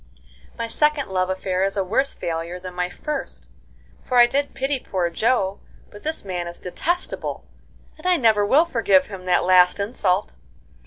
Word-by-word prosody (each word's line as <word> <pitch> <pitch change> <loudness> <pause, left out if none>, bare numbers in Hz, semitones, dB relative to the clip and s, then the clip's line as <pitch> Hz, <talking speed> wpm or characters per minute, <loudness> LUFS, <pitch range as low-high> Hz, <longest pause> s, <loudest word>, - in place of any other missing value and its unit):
"My 230 -1 -3
second 300 +2 +1
love 185 -1 0
affair 190 0 -1
is 195 +1 0
a 195 - +2
worse 265 +9 0
failure 170 +1 -4
than 180 0 -8
my 180 0 -2
first, 295 +8 -5 0.5
for 250 - 0
I 240 - +9
did 280 +4 -1
pity 270 +1 -1
poor 180 -7 -2
Joe, 200 -1 +1 0.3
but 205 - -12
this 315 -7 -4
man 180 -2 -3
is 170 - -5
detestable, 345 - -3 0.5
and 360 - -5
I 365 -1 +4
never 220 -6 +3
will 280 +11 +4
forgive 200 - +3
him 190 -3 -9
that 180 -1 +2
last 180 +1 +5
insult. 200 -2 -1
200 Hz, 170 wpm, -22 LUFS, 185-265 Hz, 0.5 s, I